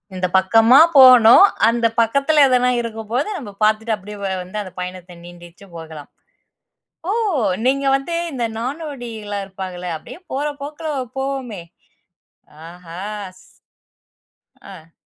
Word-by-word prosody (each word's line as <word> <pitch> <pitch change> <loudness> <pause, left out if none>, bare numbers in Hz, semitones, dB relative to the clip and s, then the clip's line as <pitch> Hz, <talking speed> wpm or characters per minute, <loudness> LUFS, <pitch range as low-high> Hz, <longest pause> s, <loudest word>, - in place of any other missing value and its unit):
இந்த 185 0 -1
பக்கமா 225 +7 +5 0.2
போணும். 255 - +8 0.3
அந்த 235 0 -1 0.2
பக்கத்துல 280 +6 +2
எதனா 250 -1 +2
இருக்கும்போது 230 - -4
நம்ப 225 -8 -9
பார்த்துட்டு 220 +1 +1
அப்பிடியே 210 +1 -11
வ - - -2 0.2
வந்து 210 +4 -6
அந்த 185 - -11
பயணத்த 180 -1 -8
நீண்டிச்சும் 175 +1 -15
போகலாம். 160 -3 -11 1.0
ஓ! - - +1 0.5
நீங்க 275 +1 +1
வந்து 275 +5 -5 0.2
இந்த 245 -3 -3
நாடோடிலாம் 240 -7 -6
இருப்பாகள்ல 185 -2 -7
அப்பிடியே 240 - -12
போற 285 +3 -2 0.2
போக்குல 305 +2 -6 0.3
போவோமே! 265 -8 -4 1.1
ஆஹா! 175 0 -12 0.4
ஸ் - - -21 1.2
ஆ. 165 -4 -14
220 Hz, 115 wpm, -19 LUFS, 185-260 Hz, 1.2 s, போணும்